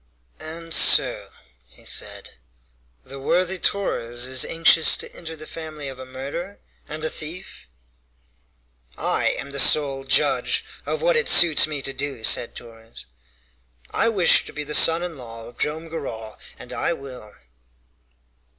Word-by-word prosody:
"And 165 +1 -6
so," - - +5 0.4
he - - -20
said, - - -5 0.7
"the 135 +1 -9
worthy 180 +6 0
Torres 120 -13 -1
is 130 0 +3
anxious 165 -1 +4
to - - -6
enter 165 -1 -7
the 155 0 -10
family 155 -4 -7
of 130 -1 -10
a 130 - -9
murderer 140 +10 -7 0.3
and 155 +1 -6
a - - +1
thief?" 160 - -8 1.3
"I - - 0
am 140 - -7
the 140 - -3
sole 135 0 +4
judge 135 - +1 0.2
of - - -3
what - - +3
it 470 0 +1
suits 160 -3 +6
me 145 -3 -5
to 135 - -1
do," 135 -3 -5
said 115 - +2
Torres. 115 -1 -13 0.9
"I 230 - +1
wish 195 -6 +4
to - - -9
be 150 - -5
the 150 +1 -5
son 165 +3 +5
in 170 -5 -6
law 115 -2 -10
of 120 +1 -14
Joam 160 +2 -1
Garral, 115 -9 -7 0.2
and - - -11
I - - -1
will." 125 -6 -11
150 Hz, 150 wpm, -22 LUFS, 130-165 Hz, 1.3 s, suits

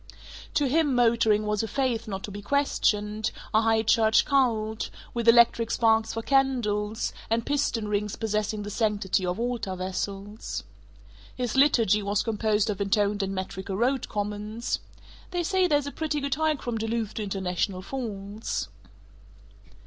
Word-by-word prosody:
To 290 - +3
him 290 0 +2
motoring 225 -3 +3
was 210 -1 0
a 225 - -2
faith 240 -1 -1
not 195 -2 -5
to 205 - -5
be 205 +1 -7
questioned, 215 -4 +1 0.2
a 220 - +5
high 225 0 +2
church 220 0 +4
cult, 225 -6 +1 0.2
with 235 -1 -2
electric 230 -1 +6
sparks 225 -1 +2
for 225 - -3
candles, 230 -6 +1 0.2
and 225 0 +1
piston 245 -6 0
rings 210 0 -1
possessing 215 -1 -2
the 205 - -6
sanctity 205 -4 0
of 180 +4 -2
altar 235 -5 -2
vessels. 195 +3 -4 0.7
His 250 -1 -2
liturgy 230 -7 +4
was 200 0 0
composed 215 -1 +1
of 200 -1 -5
intoned 205 +1 +1
and 195 0 -2
metrical 190 0 -4
road 255 +3 0
comments: 210 +2 -3 0.5
"They 355 -1 -1
say 375 +1 +2
there's 290 -4 +2
a 285 - -4
pretty 310 -1 -2
good 280 -1 -1
hike 310 -1 0
from 235 -2 -2
Duluth 225 -1 -2
to 215 - -3
International 190 -1 -2
Falls." 205 - -4
220 Hz, 150 wpm, -27 LUFS, 205-245 Hz, 0.7 s, electric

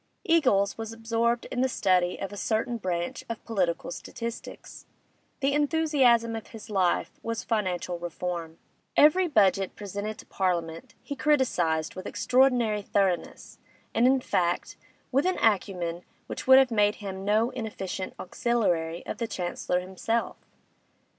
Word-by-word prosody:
Eagles 255 -13 +3
was 225 0 -4
absorbed 230 +1 0
in 250 - -1
the 260 - +2
study 180 -6 +2
of 195 +1 -5
a - - -6
certain 225 +4 -1
branch 175 -4 -3
of 230 - -6
political 180 -8 -1
statistics; 230 +5 -7 0.5
the 275 +1 +2
enthusiasm 285 -7 +3
of 225 - -7
his 220 -1 -11
life 185 -3 +1
was 230 0 -3
Financial 185 -5 -1
Reform. 170 -1 -5 0.4
Every 355 +5 +6
budget 195 - +2
presented 205 +1 -5
to - - -12
Parliament 170 -3 -2
he 285 - -5
criticised 180 - +1
with 185 - -7
extraordinary 250 -5 +2
thoroughness, 195 -3 -1 0.3
and, 240 - +4
in 265 0 +3
fact, 175 -7 -1 0.4
with 275 +6 +2
an 370 - +1
acumen 180 -5 0 0.2
which - - -7
would 260 0 +9
have 265 -2 +5
made 210 -2 +3
him 195 -2 -6
no 215 +4 +2
inefficient 200 -6 -5
auxiliary 175 -7 -1
of - - -5
the 230 - -1
Chancellor 180 -2 -2
himself. 190 +5 -2
210 Hz, 140 wpm, -27 LUFS, 180-240 Hz, 0.5 s, would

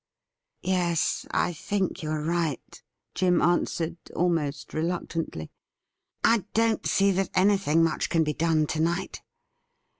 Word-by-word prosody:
' - - -61 0.2
Yes, 175 -3 0
I 175 - 0
think 190 +3 -2
you 155 - -4
are 155 -1 -2
right,' 165 -3 -2 0.3
Jim 180 -1 +2
answered, 170 -1 0 0.2
almost 165 -5 -1
re 155 - -1
luctantly. 165 - -3 0.4
' - - -54
I 215 -6 0
don't 225 0 +2
see 200 0 +3
that 190 +1 0
anything 185 -4 +3
much 165 -1 0
can 165 -1 +3
be 150 -1 -1
done 160 -1 +2
to 155 - -3
night. 170 +4 -1
170 Hz, 145 wpm, -26 LUFS, 160-185 Hz, 0.4 s, see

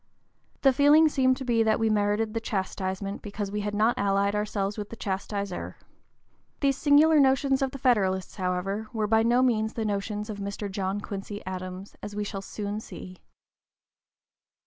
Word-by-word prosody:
The 270 -1 +6
feeling 295 +4 +6
seemed 260 -3 +2
to 265 - -6
be 235 -2 +2
that 220 0 +2
we 225 - +2
merited 215 +1 +1
the 225 - -1
chastisement 195 -2 -3
because 205 -1 -5
we 210 0 -2
had 205 0 -3
not 220 +3 +2
allied 200 0 +2
ourselves 210 -1 -1
with 210 -1 -6
the - - -8
chastiser. 200 -2 -4 0.8
These 275 -2 +2
singular 300 +2 +5
notions 270 0 +3
of 270 - +1
the 275 - -8
Federalists, 195 -8 +1
however, 190 +3 -2
were 220 -2 0
by 220 +1 +3
no 240 +3 +3
means 220 -3 +1
the 225 - -3
notions 210 +1 -2
of 210 -2 -6
Mr. 200 0 -4
John 195 +1 -2
Quincy 205 0 -6
Adams, 185 +1 -6
as 205 0 -7
we 210 - -1
shall 200 -1 -5
soon 205 +1 -4
see. 185 -4 -10
210 Hz, 170 wpm, -27 LUFS, 200-230 Hz, 0.8 s, The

